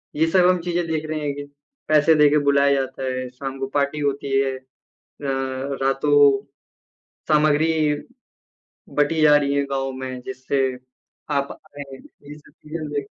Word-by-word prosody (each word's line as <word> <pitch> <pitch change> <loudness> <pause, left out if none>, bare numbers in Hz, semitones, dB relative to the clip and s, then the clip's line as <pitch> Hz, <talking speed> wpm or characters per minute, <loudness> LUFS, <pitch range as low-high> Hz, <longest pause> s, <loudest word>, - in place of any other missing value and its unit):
ये 160 +2 +2
सब 180 -2 +5
हम 180 -1 +2
चीज़े 175 0 -1
देख 155 -1 -2
रहे 155 - -2
हैं 145 -1 -2
कि 145 - -6 0.4
पैसे 155 +1 +4
देकर 150 0 +5
बुलाया 140 0 +4
जाता 135 -1 -2
है, 130 -1 -3
शाम 135 +1 -7
को 135 - -2
पार्टी 145 +1 0
होती 140 -1 -1
है, 135 -1 +1 0.7
र 135 0 -3
रातो 140 0 +4 0.9
सामग्री 155 +1 +3 1.2
बटी 150 +2 +1
जा 150 -1 +7
रही 140 -1 +1
है 140 - +1
गाँव 135 0 -1
में 130 -1 -6
जिससे 130 +1 -2 0.7
आप 140 -1 -1 0.2
आएँ। 140 -2 -8
ये 145 +2 -14
सब 150 - -21
क्लीअर 155 0 -6
देख 145 -2 -3
140 Hz, 155 wpm, -22 LUFS, 135-150 Hz, 1.2 s, जा